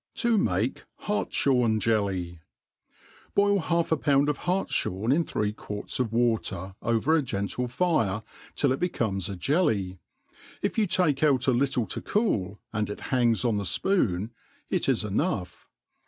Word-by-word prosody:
To 235 -1 +2
make 110 - 0 0.2
Hartjhorn 125 - +1
Jelly. 95 -6 -1 1.0
BOIL 200 0 +4
half 170 -1 0
a 160 - +3
pound 145 -1 +2
of 145 - -1
hartfliorn 130 - 0
in 170 +3 +2
three 105 -8 -2
quarts. 105 +1 -6
of 120 -4 0
water 110 -5 0
over 115 +7 +1
a 160 - +3
gentle 120 0 -2
fire, 120 - 0 0.3
till 140 - +2
it 130 - 0
becomes 105 - -1
a 100 - -4
jelly. 105 - 0 0.6
If - - 0
you 210 - +2
take 170 -6 +2
outi, 135 -4 +3
little 130 -2 +1
to 90 - -5
cool, 105 - 0
and 110 -2 -1
it 105 - -5
hangs 120 -2 +2
on 115 -3 +2
the 100 - -2
fpoon, 105 - 0 0.4
it - - +1
is - - +2
enough. 105 - -2
120 Hz, 150 wpm, -27 LUFS, 105-155 Hz, 1.0 s, BOIL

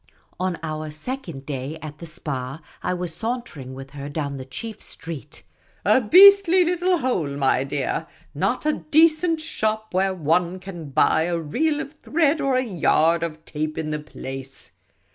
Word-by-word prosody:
On 185 -2 -1
our 155 -1 -4
second 155 - -5
day 140 +2 -4
at 150 -1 -9
the 170 - -6
Spa, 145 -4 -4 0.2
I - - -1
was 180 -2 -3
sauntering 220 - -4
with 135 0 -9
her 140 0 -7
down 145 -2 -3
the 130 - -7
chief 215 - -7
street 160 -3 -8
— - - -36
' - - -35
' - - -36
a 260 - +5
beastly 375 - +8
little 355 +1 +2
hole, 170 - -1
my 135 -1 +2
dear; 140 +3 -2 0.3
not 195 - -1
a 305 - +3
decent 320 +2 +3
shop 220 - -2
where 190 +1 +1
one 170 +2 +1
can 180 -5 -8
buy 160 +4 +3
a 175 0 0
reel 290 - 0
of 305 -1 -6
thread 310 0 +1
or 270 -1 +1
a 255 - +2
yard 170 -5 +2
of 160 -1 -5
tape 155 0 -3
in 155 -1 -2
the 150 - -2
place 135 -2 -8
170 Hz, 180 wpm, -23 LUFS, -, 0.3 s, beastly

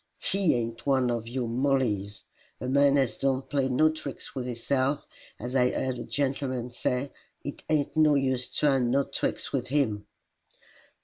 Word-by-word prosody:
HE 195 -7 +1
ain't 115 +2 -3
one 130 -3 +3
of 115 -1 -3
your 120 0 -2
Mollies. 115 -6 0 0.3
A 125 - -4
man 140 +1 +4
as 135 -4 +1
don't 135 -1 0
play 135 -2 0
no 145 +5 +4
tricks 155 -3 -7
with 130 -2 -4
hisself, 130 +3 0 0.3
as 125 +3 -5
I 125 -1 +4
heerd 130 -1 -2
a - - -4
gentleman 130 -3 -2
say, 125 +3 -1 0.3
it 145 - -6
ain't 150 -1 +1
no 155 -2 +5
use 130 -2 0
tryin' 135 -4 +2
no 140 +3 +3
tricks - - -3
with 125 -3 -1
HIM." 110 -7 0
130 Hz, 165 wpm, -28 LUFS, 125-140 Hz, 0.3 s, no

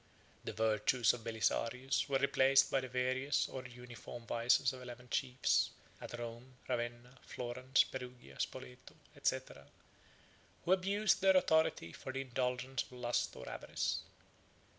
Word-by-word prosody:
8 - - -27
The - - -3
virtues 110 +2 +3
of 120 -2 -7
Belisarius 115 +5 0
were 135 - +3
replaced 135 0 +4
by 135 - +3
the 130 - -5
various 130 +3 +1
or 130 -1 -6
uniform 120 -1 -10
vices 120 +3 +3
of 130 - -9
eleven 125 0 -9
chiefs, 125 0 +2 0.3
at 120 - -6
Rome, 120 +2 -7
Ravenna, 120 +1 -3
Florence, 130 +2 +1
Perugia, 125 - -9
Spoleto, 65 0 -5 0.3
&c., - - +3 1.3
who 175 - +1
abused 195 +3 +3
their 190 -1 +6
authority 160 - +2
for 130 - -6
the 135 +1 -2
indulgence 130 0 -1
of - - -9
lust 120 -1 -1
or 65 - -9
avarice. - - -2
125 Hz, 140 wpm, -36 LUFS, 120-135 Hz, 1.3 s, their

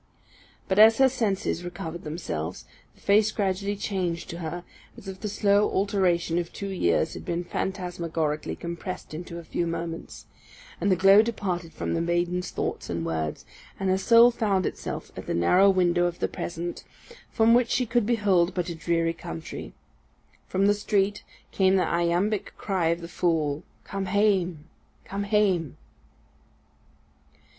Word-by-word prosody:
But 190 +1 +1
as 220 +1 +8
her 265 - +6
senses 210 -8 -1
recovered 175 -1 -6
themselves, 120 - -4 0.3
the - - -24
face 210 +1 +4
gradually 200 -1 -1
changed 180 -4 -3
to 170 - -7
her, 175 +1 -5 0.3
as 195 - -12
if 190 -1 -7
the 210 - -4
slow 205 0 +3
alteration 185 -4 +1
of 170 -1 -4
two 200 - -5
years 85 - +1
had - - -8
been 170 +1 -2
phantasmagorically 170 -5 -2
compressed 170 0 -6
into 170 +1 -7
a 170 - -7
few 170 +1 -2
moments; 165 0 -5 0.6
and 200 - +2
the - - +5
glow 195 +3 +7
departed 185 -7 -3
from - - -3
the 165 - 0
maiden's 175 +1 0
thoughts - - -4
and 85 -1 -2
words, 80 -2 -3 0.3
and 190 -1 +1
her 190 - +3
soul 235 +3 +7
found 200 -6 0
itself - - -5
at - - -8
the - - -1
narrow 180 - +5
window 175 -2 +3
of 175 0 -4
the - - 0
present, 175 0 -5 0.5
from 225 0 +4
which 240 -1 +4
she 250 - +1
could 235 -2 +1
behold 195 -7 +2
but 180 -1 -1
a - - -3
dreary 165 0 0
country. 80 - -7 0.8
From 190 +1 +1
the 205 - +5
street 205 -1 0 0.3
came 190 -1 +3
the 185 - +3
iambic 175 +5 0
cry 185 -5 0
of 170 +1 0
the 170 - -6
fool, 160 -4 0 0.2
_"Come 195 -1 -4
hame, 185 -5 +1 0.4
come 200 +1 -4
hame." 195 -8 +1
180 Hz, 160 wpm, -26 LUFS, 170-200 Hz, 0.8 s, as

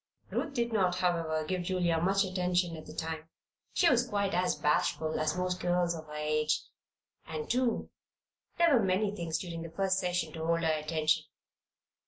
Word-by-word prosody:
Ruth 290 -3 -2
did 235 -2 0
not, 185 -4 +2
however, 165 -3 0
give 185 +2 -1
Julia 175 -2 +1
much 195 +3 +3
attention 180 -2 0
at 155 - -10
the - - -9
time. 160 0 -4 0.4
She 355 - +3
was 245 -4 +4
quite 200 -2 0
as 180 +1 +2
bashful 155 +1 +1
as 155 +2 0
most 180 0 -1
girls 175 -1 +1
of 160 -2 -8
her 150 - -9
age; 155 0 +1 0.6
and, 155 -1 -4
too, 245 -1 0 0.7
there 335 -4 +5
were 230 - +3
many 195 +2 +1
things 165 -4 -2
during 165 -1 -5
that 165 0 -8
first 190 -1 +2
session 180 -1 -1
to 160 -2 -5
hold 165 +1 +1
her 160 -1 +3
attention. 155 0 +1
175 Hz, 180 wpm, -31 LUFS, 160-190 Hz, 0.7 s, there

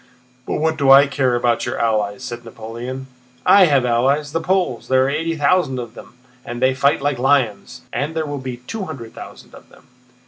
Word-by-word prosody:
"But - - -2
what 160 +1 0
do 140 -2 +1
I 135 +1 +9
care 135 -3 0
about 120 -1 0
your - - -3
allies?" 110 0 -1
said 120 -2 -6
Napoleon. 115 +4 -7 0.4
"I 195 -2 +7
have 140 -6 +2
allies—the 140 +6 +1
Poles. 180 - -1
There 130 0 +3
are - - 0
eighty 165 +3 -2
thousand 160 -3 +1
of 120 -2 -6
them - - -13 0.3
and 120 0 -6
they 130 +1 +3
fight 140 +2 +1
like 140 -3 0
lions. 130 -5 0
And 150 +3 -3
there 160 -1 -1
will 145 -1 -5
be 130 -2 -6
two 215 - -5
hundred 125 -9 -8
thousand - - -12
of - - -15
them." - - -20
130 Hz, 200 wpm, -19 LUFS, 120-150 Hz, 0.4 s, I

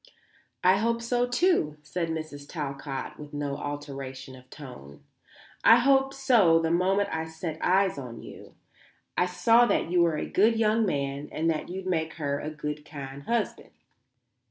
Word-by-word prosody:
"I 185 +1 +5
hope 230 +2 0
so, 240 +1 0
too," 245 - +1
said 170 +2 -3
Mrs. 155 -3 -6
Talcott 140 -3 -5
with 150 -1 -9
no 145 -1 -2
alteration 135 -2 -6
of 130 0 -17
tone. 120 - -11 0.6
"I 225 - +9
hoped 270 +2 +3
so 235 - +4
the 165 0 0
moment 190 +4 +2
I 160 0 -2
set 160 0 -6
eyes 190 -4 +2
on 120 -4 -8
you. - - -12 0.6
I 180 - +2
saw 230 +6 +4
that 170 - 0
you 180 -1 +4
were 165 -2 +2
a - - -2
good 220 +4 +3
young 220 0 +2
man 140 -2 -2
and 165 +1 0
that 155 - -4
you'd 185 +1 -6
make 165 -3 -1
her 145 -2 -2
a 155 - -4
good 150 -1 -5
kind 140 -2 -8
husband." 235 0 -2
160 Hz, 165 wpm, -27 LUFS, 145-200 Hz, 0.6 s, I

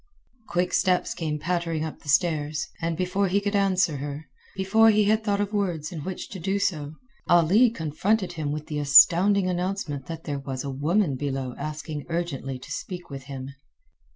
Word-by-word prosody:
Quick 180 +1 -1
steps 185 -2 +2
came 155 -3 -3
pattering 165 -1 -1
up 160 - -7
the 145 - -11
stairs, 155 -1 +1
and 165 -1 -1
before 185 +2 0
he 190 +2 +2
could 205 0 -2
answer 190 -6 +2
her, 145 +2 -6 0.3
before 220 +4 +4
he 215 -1 +4
had 215 +2 +2
thought 205 -2 0
of 205 0 -2
words 175 -7 -1
in 170 - -6
which 180 +5 -6
to 190 - -7
do 195 +4 -1
so, 155 -6 -2 0.3
Ali 175 +8 +5
confronted 185 +2 -1
him 155 -4 -3
with 150 0 -4
the 150 -1 -4
astounding 180 +8 +6
announcement 180 -6 -3
that 165 -1 -6
there 145 -2 -3
was 135 -1 -5
a 140 - -4
woman 150 +2 +1
below 135 -2 -3
asking 150 0 -6
urgently 165 -6 -3
to 135 +3 -12
speak 175 +4 -6
with 135 -1 -7
him. 135 -1 -7
165 Hz, 180 wpm, -25 LUFS, 145-190 Hz, 0.3 s, astounding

